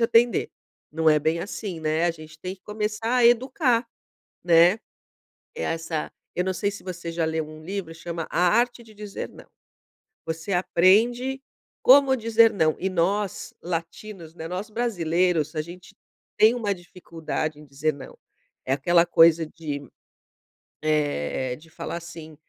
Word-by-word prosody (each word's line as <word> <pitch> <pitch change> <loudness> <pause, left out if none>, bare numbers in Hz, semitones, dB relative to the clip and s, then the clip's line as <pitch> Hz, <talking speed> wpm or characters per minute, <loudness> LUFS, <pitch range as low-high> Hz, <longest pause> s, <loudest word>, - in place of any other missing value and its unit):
te - - 0
atender." 230 +1 +3 0.4
Não 160 0 +2
é 150 -1 +5
bem 160 +3 +1
assim, 195 -1 -5
né, 155 +2 +1
a - - +3
gente 155 -1 -12
tem 185 +2 -5
que - - -38
começar 210 +3 -2
a 240 - +4
educar, 245 0 +2 0.6
né. 175 +4 +5 0.8
É - - -5
essa 165 -1 -3 0.2
eu 180 - +1
não 190 - -1
sei 200 +3 -1
se 200 - -10
você 175 -2 -6
já 165 -1 -1
leu 160 -1 -2
um 155 0 -12
livro, 180 -2 -5
chama 165 0 -6
A - - 0 0.2
Arte 245 0 +1
de 220 -2 -17
Dizer 205 -1 -6
Não. - - -14 0.8
Você 160 +4 -4
aprende 230 +9 +3 0.4
como 270 0 +7
dizer 230 -1 +4
não. 160 -5 +2
E 190 - -1
nós, 190 +2 -1
latinos, 170 0 -6
né, 160 - -6
nós 185 +5 -5
brasileiros, 175 -8 0
a 155 - 0
gente 175 +2 -13 0.4
tem 220 +2 +6
uma 220 -5 -1
dificuldade 165 -4 -5
em 150 - -13
dizer 145 +3 -1
não. 135 -2 -11 0.5
É 130 - -1
aquela 170 +5 +3
coisa 165 -1 +5
de, 155 -2 -6 1.0
eh, 145 - 0
de 160 +2 -18
falar 160 - -5
assim, 165 -2 -10
175 Hz, 155 wpm, -25 LUFS, 160-210 Hz, 1.0 s, como